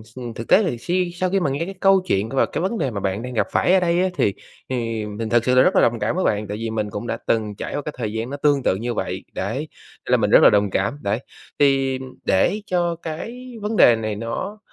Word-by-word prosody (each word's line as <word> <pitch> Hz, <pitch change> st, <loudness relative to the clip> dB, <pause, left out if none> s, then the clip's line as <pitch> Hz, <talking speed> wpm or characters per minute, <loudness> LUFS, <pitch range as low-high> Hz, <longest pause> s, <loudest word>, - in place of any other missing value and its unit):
ừm, 120 Hz, -2 st, -6 dB
thực 115 Hz, -, -6 dB
tế 210 Hz, -, +5 dB
thì 165 Hz, -11 st, -1 dB
si 180 Hz, +7 st, -1 dB
sau 185 Hz, +1 st, -1 dB
khi 195 Hz, +1 st, +1 dB
mà 175 Hz, -, 0 dB
nghe 140 Hz, +5 st, -2 dB
cái 195 Hz, +2 st, -7 dB
câu 195 Hz, 0 st, +5 dB
chuyện 100 Hz, -, 0 dB
và 135 Hz, -, +2 dB
cái 155 Hz, -, -4 dB
vấn 195 Hz, +6 st, -1 dB
đề 135 Hz, -, -1 dB
mà 105 Hz, -, -4 dB
bạn 95 Hz, +2 st, -2 dB
đang 125 Hz, +1 st, -6 dB
gặp 115 Hz, -, +1 dB
phải 180 Hz, -, +3 dB
ở 190 Hz, -, +6 dB
đây 175 Hz, 0 st, +1 dB
á 185 Hz, -, +2 dB
thì 100 Hz, -, +1 dB, 0.4 s
thì 115 Hz, -4 st, -2 dB
mình 105 Hz, +2 st, -5 dB
thực 120 Hz, 0 st, +2 dB
sự 125 Hz, -, +3 dB
là 130 Hz, -, +7 dB
rất -, -, +3 dB
là -, -, +5 dB
đồng 115 Hz, 0 st, +2 dB
cảm 105 Hz, +7 st, -1 dB
với 185 Hz, -, 0 dB
bạn, 105 Hz, 0 st, 0 dB
tại 105 Hz, +1 st, -4 dB
vì 115 Hz, +1 st, -3 dB
mình 110 Hz, -2 st, -2 dB
cũng 105 Hz, +3 st, -6 dB
đã -, -, -2 dB
từng 110 Hz, -2 st, 0 dB
trải -, -, -5 dB
qua -, -, -1 dB
cái 150 Hz, +1 st, -6 dB
thời 110 Hz, -4 st, -3 dB
gian 110 Hz, +2 st, -3 dB
nó 140 Hz, -, -5 dB
tương 145 Hz, -2 st, +2 dB
tự -, -, +2 dB
như 120 Hz, +5 st, -3 dB
vậy, -, -, -3 dB
đấy, -, -, -3 dB, 0.5 s
nên -, -, -4 dB
là -, -, +6 dB
mình -, -, +1 dB
rất -, -, +7 dB
là -, -, +9 dB
đồng 105 Hz, 0 st, +2 dB
cảm, 100 Hz, +8 st, -1 dB
đấy. 100 Hz, +3 st, -1 dB, 0.4 s
Thì 135 Hz, -2 st, +3 dB, 0.2 s
để 150 Hz, -, +2 dB
cho 175 Hz, -3 st, 0 dB
cái 235 Hz, +11 st, -7 dB
vấn 210 Hz, +2 st, -2 dB
đề 120 Hz, -, +7 dB
này 110 Hz, -2 st, -3 dB
nó 115 Hz, -, -5 dB
125 Hz, 280 wpm, -22 LUFS, 110-175 Hz, 0.5 s, là